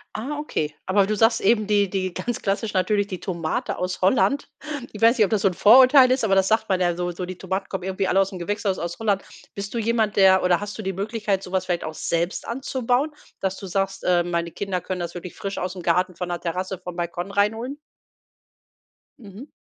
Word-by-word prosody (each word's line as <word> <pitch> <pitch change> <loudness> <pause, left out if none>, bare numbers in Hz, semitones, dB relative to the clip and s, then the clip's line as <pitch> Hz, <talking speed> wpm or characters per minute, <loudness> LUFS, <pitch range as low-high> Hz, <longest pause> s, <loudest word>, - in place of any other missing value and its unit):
Ah, 275 +8 -4
okay. 155 - -2
Aber 195 +1 +4
du 215 +2 -1
sagst 225 +2 +3
eben, 215 0 +3
die 205 -2 +2
die 185 -1 -2
ganz 240 +4 -3
klassisch 205 +2 -1
natürlich 200 +1 +1
die 185 -3 -6
Tomate 170 -4 -3
aus 180 0 -3
Holland. 260 +8 +2 0.4
Ich 210 - -10
weiß 230 +3 +5
nicht, 215 - +5
ob - - -4
das 215 -3 +2
so - - +5
'n 185 - 0
Vorurteil 255 +6 +7
ist, 260 -1 +1
aber 205 -3 +2
das 190 0 +3
sagt 220 +1 +1
man 190 -1 +2
ja 175 -1 +1
so 175 0 -2
so 180 +1 -5
die 185 0 -7
Tomaten 190 +1 -3
kommen 190 -2 -4
irgendwie 190 +1 -1
alle 190 - +3
aus'm 195 -1 -3
Gewächshaus 200 +1 -2
aus 170 +1 -4
Holland. 205 -3 +1 0.3
Bist 200 0 -6
du - - -2
jemand, 225 -2 +1
der 190 -1 +5
oder 180 -1 +3
hast 205 0 -6
du - - -5
die 195 -2 -3
Möglichkeit, 205 0 -2
so 180 - -9
was 190 -1 0
vielleicht 175 -2 -1
auch 155 - -5
selbst 170 +3 -2
anzubauen, 260 +3 -1 0.3
dass 190 0 -1
du 195 - -8
sagst: 195 +1 -2
„Äh, 175 -1 +3
meine 170 -1 -2
Kinder 190 +1 -3
können 185 +1 -4
das 170 - -4
wirklich 175 0 -8
frisch 195 0 -5
aus'm 180 0 -4
Garten 180 +1 +1
von 180 0 -4
der 175 - -3
Terrasse 185 +2 -3
vom 180 -1 -8
Balkon 175 +2 -4
reinholen?“ 225 +7 0 1.4
Mhm. 215 +4 -11
195 Hz, 225 wpm, -23 LUFS, 180-215 Hz, 1.4 s, Vorurteil